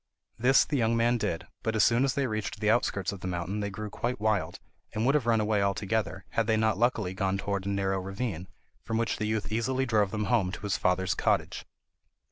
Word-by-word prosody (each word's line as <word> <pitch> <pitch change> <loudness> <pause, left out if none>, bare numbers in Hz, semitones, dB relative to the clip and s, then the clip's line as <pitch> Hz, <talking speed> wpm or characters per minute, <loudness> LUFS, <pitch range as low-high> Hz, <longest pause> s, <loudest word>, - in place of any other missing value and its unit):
This 130 +3 +5
the 150 - -1
young 115 0 +2
man 120 +1 +2
did, 85 -6 -2 0.2
but 110 0 -1
as 110 - +4
soon 115 +4 +4
as 135 - +1
they 140 - +1
reached 110 -3 -3
the 105 -1 +3
outskirts 100 -5 +1
of 100 - -7
the 95 - -5
mountain 90 +3 -3
they 100 -1 -2
grew 105 +1 -6
quite 120 +2 -2
wild, 105 -2 0 0.3
and 110 +2 -1
would 135 - +4
have 145 -6 +1
run 115 -1 +4
away 105 -1 +1
altogether, 100 0 -1
had 115 -2 0
they 110 -1 +3
not 110 -2 +1
luckily 115 -6 +1
gone 95 0 0
towards 100 -1 -3
a - - 0
narrow 95 -1 0
ravine, 95 -1 -4 0.3
from 115 -1 -2
which 115 0 0
the 110 - -2
youth 110 0 -2
easily 130 +4 0
drove 105 -5 +2
them 105 +1 -2
home 100 -5 +2
to - - -7
his 105 0 -1
father's 95 -2 +1
cottage. - - 0
110 Hz, 230 wpm, -28 LUFS, 100-115 Hz, 0.3 s, This